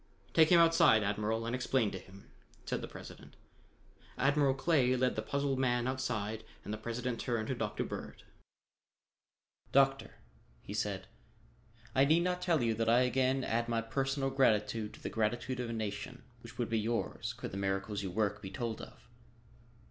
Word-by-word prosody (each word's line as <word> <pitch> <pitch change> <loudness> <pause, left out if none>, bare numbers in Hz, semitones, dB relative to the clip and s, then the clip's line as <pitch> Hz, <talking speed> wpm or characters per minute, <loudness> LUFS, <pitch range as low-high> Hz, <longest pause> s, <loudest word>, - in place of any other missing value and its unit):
"Take 160 -1 +6
him 175 - +7
outside, 165 -10 +6
Admiral, 105 +2 -1
and 115 - -2
explain 125 -3 +1
to 95 - -5
him," 95 +2 -16 0.3
said - - -2
the - - -5
President. - - -11 0.8
Admiral 140 0 +3
Clay 135 -4 +3
led 130 0 +1
the 110 - -1
puzzled 140 +3 -1
man 120 -1 +1
outside 110 -5 -2 0.2
and 105 - -4
the - - -3
President 120 +2 -3
turned 115 -3 -2
to - - +1
Dr. 110 -4 -2
Bird. - - -7 1.5
"Doctor," 135 0 +3 0.5
he 100 - -7
said, 100 -2 -2 0.9
"I 135 +1 +5
need 160 +4 +4
not 180 0 -1
tell 170 -7 +2
you 115 -1 +2
that 115 +1 0
I 120 +2 +5
again 130 +1 +2
add 115 0 0
my 115 -1 0
personal 135 +3 -1
gratitude 110 -4 +1
to - - -15
the - - -2
gratitude 120 +3 -1
of 125 -2 -3
a - - -3
nation 110 +3 -5 0.2
which 115 - -12
would 120 -2 -2
be 115 - +2
yours, 115 +2 -2
could - - -6
the 95 - -5
miracles 95 +1 -1
you 95 - -3
work 105 +2 -1
be 95 - -6
told 115 +3 -4
off. 120 - -13
120 Hz, 175 wpm, -33 LUFS, 110-135 Hz, 1.5 s, him